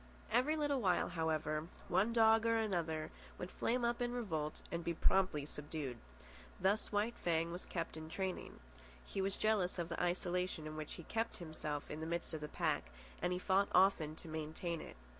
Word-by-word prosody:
Every 255 +7 +4
little 290 -4 +1
while, 180 -4 +3
however, 155 -2 0 0.2
one 210 +5 +3
dog 225 -1 +6
or 230 - +4
another 170 -7 0 0.3
would 180 - -5
flame 240 +1 +1
up 235 +1 0
in 240 0 +1
revolt 160 -11 -2
and 170 0 -2
be 170 0 -1
promptly 185 -5 +3
subdued. 150 -4 -4 0.6
Thus 200 +4 +2
White 210 +3 +1
Fang 165 -1 +2
was 175 +2 -5
kept 165 -3 -3
in 160 0 -7
training. 190 +2 -3 0.5
He 195 - -2
was 195 0 0
jealous 210 -5 +2
of 170 -1 -2
the 170 - -2
isolation 180 -2 0
in 155 0 -5
which 155 -1 -5
he 170 - -8
kept 225 +6 -1
himself 155 -3 -4
in 150 - -4
the 160 - -3
midst 170 0 -2
of 155 - -3
the 150 - -3
pack, 65 - 0 0.3
and 180 - +1
he 180 - +1
fought 195 +2 +3
often 180 -5 +5
to 170 - -8
maintain 160 +2 -3
it. - - -9
175 Hz, 190 wpm, -37 LUFS, 160-205 Hz, 0.6 s, dog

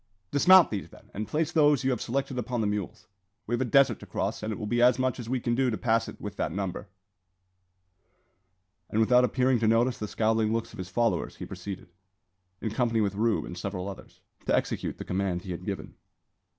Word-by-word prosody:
"Dismount 185 +4 +7
these, 100 -3 -4
then, - - -18
and 105 +2 -4
place 155 +1 -1
those 150 -5 +4
you 135 - +2
have 125 - -2
selected 135 +1 -2
upon 125 0 -2
the - - 0
mules. 105 -2 -3 0.4
We 120 - -4
have 120 - +1
a - - +2
desert 140 +3 +4
to - - -12
cross, - - -2
and 110 - -3
it 105 - -4
will 110 - -5
be 120 +3 0
as 125 0 +5
much 130 0 0
as 115 -2 -6
we 130 0 0
can 120 0 -1
do 130 +1 +2
to 110 - -2
pass 115 -1 +1
it - - -9
with - - -7
that - - -1
number." 95 +1 -4 2.0
And 110 - 0
without 125 +3 +5
appearing 125 +1 +2
to 110 - +1
notice 120 +3 +2
the 105 - -3
scowling 110 0 +1
looks 115 0 -3
of - - -11
his 95 -1 -5
followers, 120 +1 0
he - - -7
proceeded, 95 -1 -8 0.7
in 110 - -2
company 115 0 +1
with 100 -2 +1
Rube 110 +2 +1
and 90 - -7
several 95 +1 -4
others, 100 - -10 0.3
to - - +3
execute - - -2
the - - -7
command 90 -1 -1
he 95 - -6
had 85 - -6
given. - - -5
115 Hz, 220 wpm, -28 LUFS, 105-125 Hz, 2.0 s, Dismount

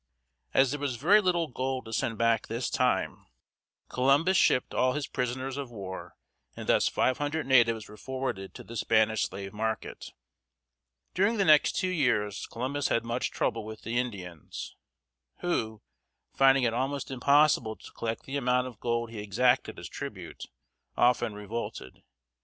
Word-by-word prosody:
As 135 -1 +4
there 145 - -3
was 140 -3 -2
very 180 - +5
little 175 -3 +1
gold 130 0 -3
to 110 - -8
send 115 0 -1
back 115 -1 +2
this 115 +2 -3
time, 95 - 0 0.6
Columbus 140 +8 +3
shipped 130 - +3
all 130 0 +2
his 150 -1 -2
prisoners 130 +2 -3
of 140 -3 -4
war, 95 -5 -8 0.4
and - - -7
thus - - +4
five 130 - +1
hundred 145 +2 -2
natives 115 -5 +3
were 105 - -13
forwarded 130 -8 -4
to - - -9
the 115 - -10
Spanish 110 -1 +2
slave 95 0 -7
market. 110 +1 -4 1.0
During 200 +5 +2
the 195 - +2
next 155 -3 +5
two 185 - 0
years 105 - 0
Columbus 135 +4 -2
had 115 - 0
much 120 +2 -1
trouble 115 -2 -1
with 110 0 -9
the 115 +2 -1
Indians, 90 - -6 0.7
who, 110 -12 -2 0.5
finding 135 -1 +5
it 115 -2 +2
almost 135 +3 -2
impossible 135 -4 +3
to - - -14
collect 115 0 -4
the 135 +1 -4
amount 125 -1 +1
of 125 -4 -9
gold 115 -1 -1
he 110 - -7
exacted 120 +6 +1
as - - -7
tribute, - - -7 0.5
often 120 -3 +3
revolted. 105 - -6
125 Hz, 160 wpm, -29 LUFS, 110-135 Hz, 1.0 s, very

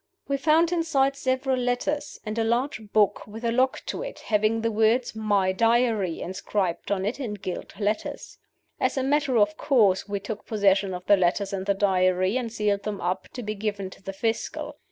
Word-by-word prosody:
"We 280 - 0
found 320 +4 +3
inside 285 -6 +2
several 260 -1 0
letters, 250 +4 -2
and 215 0 -3
a - - +2
large 235 -2 -1
book 210 -2 +2
with 225 +3 -8
a 230 - +2
lock 255 +2 +1
to - - -4
it, - - -6
having 215 +1 +1
the 230 0 0
words 225 +3 +2
'My 205 -3 +2
Diary' 225 -3 +2
inscribed 185 0 -2
on 195 -1 0
it 220 +7 -2
in 230 -7 -3
gilt 185 0 -7
letters. 210 +1 -3 0.4
As - - 0
a 265 - +1
matter 280 -2 +2
of 210 -1 +3
course, 210 -9 +3
we 200 0 -1
took 205 +1 -7
possession 195 -3 +2
of 180 0 -8
the 205 - +5
letters 190 +2 +1
and 190 0 -3
the 200 - +2
Diary, 185 0 +2
and 245 -3 -2
sealed 210 -3 0
them 205 -1 -4
up, 180 +1 -2
to 245 - -6
be 215 0 -3
given 200 -2 -3
to - - -14
the 195 - -5
Fiscal. 225 +3 -3
215 Hz, 195 wpm, -26 LUFS, 200-250 Hz, 0.4 s, the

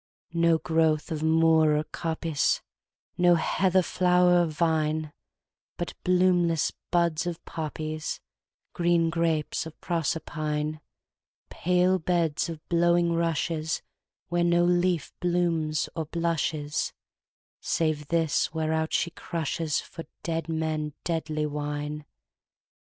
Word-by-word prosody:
No 170 -1 +4
growth 160 -1 +1
of 155 -2 -2
moor 160 -1 +4
or 150 - 0
coppice, 160 -2 -1 0.6
No 175 -1 +6
heather 185 +2 +2
flower 180 0 +4
or - - +3
vine, 155 -1 0 0.6
But 175 - -4
bloomless 180 -3 +3 0.2
buds 170 -1 +1
of 170 -1 -5
poppies, 155 -1 -4 0.5
Green 170 -1 +2
grapes 165 -2 0
of 160 - -13
Proserpine, 155 -2 -2 0.7
Pale 180 +1 +2
beds 170 -1 0
of 160 -2 -8
blowing 170 0 +3
rushesWhere 165 -1 -1 0.6
no 175 0 +3
leaf 175 -2 +1
blooms 170 -3 0
or 160 -2 -3
blushes, 160 -3 -1 0.7
Save 155 -3 -1
this 165 -2 +1
whereout 160 0 0
she 170 - +1
crushesFor 165 0 -3 0.2
dead 165 0 -2
men 155 -2 -2
deadly 155 -2 -1
wine. 150 0 -4
165 Hz, 100 wpm, -27 LUFS, 155-170 Hz, 0.7 s, No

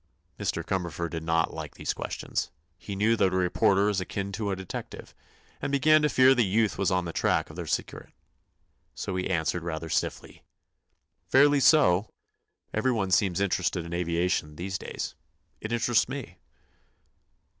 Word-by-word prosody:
Mr. - - -2
Cumberford 85 -3 -3
did 80 -1 -4
not 80 0 0
like - - -7
these - - -2
questions. - - -4 0.3
He 100 +3 -7
knew 110 +4 +3
that 95 -3 +3
a 95 - 0
reporter 95 +2 +3
is 100 -2 0
akin 100 +1 -4
to 100 +1 -3
a 95 - 0
detective, 95 -1 -8 0.5
and - - -2
began 155 +3 +5
to 150 - +2
fear 130 -1 +6
the 125 -2 +3
youth 105 +1 +1
was 100 - +1
on 90 -1 0
the 85 - -5
track - - +1
of - - -13
their - - -6
secret. - - -3 0.8
So 95 - -4
he 90 0 -2
answered 85 -1 0
rather 80 -1 -5
stiffly: - - -3 0.9
"Fairly 145 +2 +5
so. 110 - +4 0.6
Everyone 110 -4 0
seems 95 -2 +2
interested 90 -3 0
in 85 - -7
aviation 85 -3 -1
these 95 +3 -4
days. - - -5 0.5
It 110 - -6
interests 120 0 +2
me." 125 -10 -7
95 Hz, 160 wpm, -27 LUFS, 85-115 Hz, 0.9 s, fear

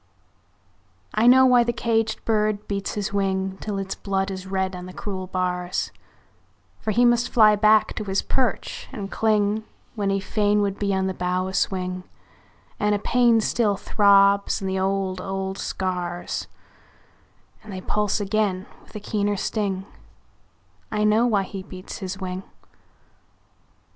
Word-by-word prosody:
I 220 +3 +3
know 260 +1 +8
why 250 -2 +6
the 235 - 0
caged 225 -1 -1
bird 215 -2 0
beats 200 -1 -3
his 205 0 -3
wing 190 -1 -1
Till 210 -2 -3
its 195 0 -3
blood 195 0 -2
is 190 0 -6
red 190 -1 -1
on 180 0 -7
the 185 - -9
cruel 190 -4 -5
bars; 180 -1 -2 0.9
For - - -4
he 240 +3 +4
must 240 0 +3
fly 215 -3 +6
back 215 +1 +4
to 215 - -2
his 195 0 0
perch 260 -2 -1
and 205 -7 -6
cling 215 -1 +1 0.3
When 205 -3 -1
he 195 0 +1
fain 205 +1 +1
would 200 -1 -2
be 200 -1 0
on 190 0 +1
the 190 - -1
bough 180 +1 -1
a 190 - -5
swing; 185 -1 -1 0.8
And 210 0 +2
a - - +1
pain 235 +1 +3
still 210 -2 +1
throbs 200 0 +4
in 195 - -4
the 190 0 -1
old, 190 -1 -1
old 195 0 -4
scars 180 -2 -3 1.2
And 215 - -10
they 190 - -5
pulse 210 +2 0
again 205 -2 0 0.2
with - - -21
a - - -3
keener 205 0 -1
sting 195 -2 -2 1.1
I 210 -1 0
know 215 +3 +4
why 205 -4 +2
he 195 0 -7
beats 185 -1 -9
his 190 0 -5
wing! 185 -1 -4
200 Hz, 160 wpm, -24 LUFS, 190-215 Hz, 1.2 s, know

